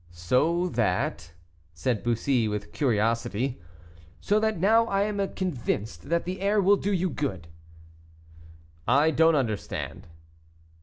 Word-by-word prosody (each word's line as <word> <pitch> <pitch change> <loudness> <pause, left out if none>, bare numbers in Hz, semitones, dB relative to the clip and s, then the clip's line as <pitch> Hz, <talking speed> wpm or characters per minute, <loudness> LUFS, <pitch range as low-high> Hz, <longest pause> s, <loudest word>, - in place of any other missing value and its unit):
"So 130 - +1
that 85 - -1 0.2
" 85 - -34
said 115 +5 -1
Bussy, 120 0 +1
with 105 -1 -4
curiosity. 115 - 0 0.6
"So 210 +1 +2
that 220 -1 0
now 225 +5 +4
I 195 -2 +1
am 200 -2 -2
convinced 110 - -3
that 170 0 +1
the 185 +1 -5
air 205 +2 +2
will 200 +1 +4
do 205 - -2
you 185 -2 0
good." 95 - -4 1.4
"I 145 +4 +4
do 160 +2 +3
not - - +1
understand." 110 - -3
140 Hz, 135 wpm, -26 LUFS, -, 1.4 s, now